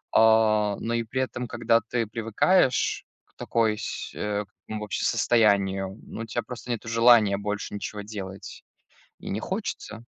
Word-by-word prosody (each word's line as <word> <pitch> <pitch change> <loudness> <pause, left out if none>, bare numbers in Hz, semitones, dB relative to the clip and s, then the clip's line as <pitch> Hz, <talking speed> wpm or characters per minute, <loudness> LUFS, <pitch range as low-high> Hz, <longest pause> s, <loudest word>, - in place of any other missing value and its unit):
А, 110 -2 +4
но 115 +1 -3
и 115 0 0
при 130 +4 -2
этом, 125 -1 -3
когда 115 -1 +2
ты 115 +1 -2
привыкаешь 115 - +2 0.2
к - - -37
такой 110 -2 0
сь - - -5
э, 105 0 -2
к - - -35 0.2
такому 110 -1 -5
вообще 105 - -3
состоянию, 100 -4 +2
ну, - - -7
у - - -4
тя 115 +2 -2
просто 125 +2 -9
нету 115 -1 -4
желания 115 -3 +5
больше 105 0 -4
ничего 105 0 -5
делать 100 -3 -8 0.6
и - - -7
не 105 - -2
хочется. 150 - -5
110 Hz, 165 wpm, -26 LUFS, 105-115 Hz, 0.6 s, желания